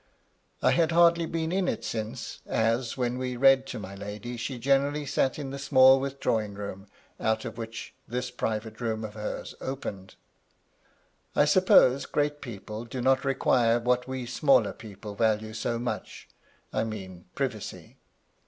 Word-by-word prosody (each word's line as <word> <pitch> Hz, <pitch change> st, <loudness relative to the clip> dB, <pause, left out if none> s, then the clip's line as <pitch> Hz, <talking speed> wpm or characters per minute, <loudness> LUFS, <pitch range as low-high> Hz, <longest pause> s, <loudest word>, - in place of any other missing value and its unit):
I -, -, +5 dB
had 170 Hz, -1 st, +3 dB
hardly 170 Hz, 0 st, +5 dB
been 165 Hz, 0 st, -2 dB
in 185 Hz, 0 st, +1 dB
it 115 Hz, 0 st, -2 dB
since; 110 Hz, +2 st, -5 dB
as, 115 Hz, +3 st, 0 dB
when 125 Hz, 0 st, -1 dB
we 125 Hz, -1 st, -3 dB
read 135 Hz, +1 st, +5 dB
to 125 Hz, -, -5 dB
my 100 Hz, -2 st, -7 dB
lady, 105 Hz, +5 st, -6 dB
she 125 Hz, +2 st, -4 dB
generally 140 Hz, +4 st, +1 dB
sat 135 Hz, -1 st, +1 dB
in 140 Hz, -3 st, -5 dB
the 140 Hz, -, -5 dB
small 135 Hz, -1 st, +6 dB
withdrawing 115 Hz, -6 st, -1 dB
room 100 Hz, -1 st, -7 dB, 0.3 s
out 110 Hz, 0 st, 0 dB
of 115 Hz, -, -6 dB
which 115 Hz, 0 st, -7 dB
this 125 Hz, +1 st, -3 dB
private 110 Hz, -1 st, -3 dB
room 110 Hz, -2 st, -2 dB
of 105 Hz, -, -8 dB
hers 105 Hz, 0 st, -5 dB
opened 100 Hz, -8 st, -6 dB, 1.2 s
I 145 Hz, -, +5 dB
suppose 150 Hz, -5 st, +5 dB
great 145 Hz, 0 st, -1 dB
people 110 Hz, -2 st, -7 dB
do 120 Hz, +2 st, -6 dB
not 130 Hz, +2 st, +3 dB
require 125 Hz, -3 st, +3 dB
what 125 Hz, +1 st, +1 dB
we 130 Hz, -1 st, -4 dB
smaller 125 Hz, -2 st, +3 dB
people 105 Hz, -1 st, -9 dB
value 110 Hz, 0 st, 0 dB
so 115 Hz, +1 st, -2 dB
much, 120 Hz, +1 st, -5 dB, 0.2 s
— -, -, -36 dB
I -, -, +1 dB
mean 95 Hz, -5 st, -7 dB
privacy. -, -, -4 dB
120 Hz, 160 wpm, -28 LUFS, 110-135 Hz, 1.2 s, small